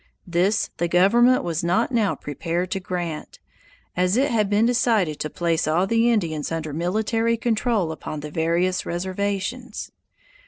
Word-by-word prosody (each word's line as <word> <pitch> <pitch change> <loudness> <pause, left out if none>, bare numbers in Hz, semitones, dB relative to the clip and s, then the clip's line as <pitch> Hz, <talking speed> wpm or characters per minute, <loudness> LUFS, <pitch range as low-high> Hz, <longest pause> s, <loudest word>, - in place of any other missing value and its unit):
This 185 +5 +1
the 170 - 0
government 235 +9 +4
was 170 -1 -2
not 180 +9 +1
now 225 -5 +1
prepared 170 +5 -3
to 195 - -1
grant, 175 -4 -5 0.6
as 180 +4 +2
it 280 +2 +2
had 215 -4 +1
been 210 +2 +3
decided 225 -10 +1
to 155 - -3
place 165 -1 0
all 165 +4 +2
the 230 +3 +2
Indians 165 -10 -1
under 160 -2 -3
military 220 +7 0
control 225 -6 0
upon 155 -1 -6
the 150 0 -7
various 170 +4 0
reservations. 200 +7 -3
185 Hz, 150 wpm, -23 LUFS, 170-225 Hz, 0.6 s, government